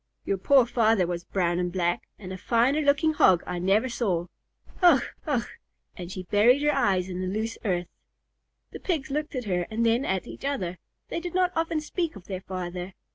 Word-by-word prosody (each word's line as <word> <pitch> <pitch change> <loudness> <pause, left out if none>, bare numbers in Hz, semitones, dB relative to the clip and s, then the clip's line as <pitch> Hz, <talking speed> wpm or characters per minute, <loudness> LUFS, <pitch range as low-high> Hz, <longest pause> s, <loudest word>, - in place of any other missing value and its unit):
Your 195 - -1
poor 265 +5 +5
father 225 -5 +3
was 175 0 -4
brown 175 -2 0
and 180 0 -1
black, 175 -1 -1
and 185 -2 -8
a - - -6
finer 250 +8 +2
looking 290 +2 +3
Hog 185 - +5
I 175 - -3
never 195 +7 +2
saw. 200 -9 -1 0.6
Ugh! 345 -7 +6 0.2
Ugh!" 260 -6 +1 0.5
And 175 0 -7
she 185 -1 -5
buried 230 +9 +4
her 295 - +3
eyes 185 -2 +2
in 185 -1 -4
the 185 - -2
loose 220 +4 -3
earth. 180 -4 0 0.9
The - - -8
Pigs 310 -8 -2
looked 300 +1 -2
at 250 -2 -3
her 180 -3 -1
and 230 +1 0
then 230 +3 +3
at 190 -5 -1
each - - -10
other. 185 -11 -2 0.3
They - - -2
did 350 0 -6
not 365 -1 +3
often 325 -1 0
speak 330 0 -3
of 195 -2 -12
their 190 -1 -5
father. 180 0 -6
210 Hz, 200 wpm, -26 LUFS, 180-280 Hz, 0.9 s, Ugh